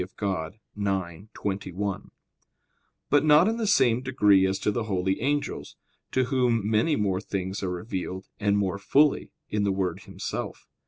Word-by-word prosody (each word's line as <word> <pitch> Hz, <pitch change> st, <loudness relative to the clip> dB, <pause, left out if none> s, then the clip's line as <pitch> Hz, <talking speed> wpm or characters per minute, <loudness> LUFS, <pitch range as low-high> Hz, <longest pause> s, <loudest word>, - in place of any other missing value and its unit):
Dei 90 Hz, -, -4 dB
ix, 95 Hz, 0 st, -4 dB
21); 100 Hz, 0 st, -3 dB, 1.0 s
but 145 Hz, -, +5 dB
not 155 Hz, +4 st, +6 dB
in 225 Hz, +1 st, 0 dB
the 225 Hz, -2 st, -1 dB
same 125 Hz, -, +4 dB
degree 105 Hz, -7 st, +4 dB
as 95 Hz, +1 st, -1 dB
to -, -, 0 dB
the 115 Hz, +1 st, -2 dB
holy 95 Hz, -1 st, -1 dB
angels, 145 Hz, +3 st, -2 dB, 0.4 s
to 130 Hz, -, +2 dB
whom 125 Hz, -4 st, +1 dB
many 110 Hz, +8 st, +2 dB
more 100 Hz, -5 st, 0 dB
things 95 Hz, -1 st, -4 dB
are 95 Hz, -, -2 dB
revealed, 95 Hz, 0 st, -4 dB
and 100 Hz, -1 st, +2 dB
more 100 Hz, -1 st, -1 dB
fully, 145 Hz, +8 st, +3 dB, 0.2 s
in 105 Hz, -, 0 dB
the 100 Hz, -, +2 dB
Word 95 Hz, -2 st, -1 dB
Himself. -, -, -5 dB
100 Hz, 155 wpm, -26 LUFS, 95-125 Hz, 1.0 s, not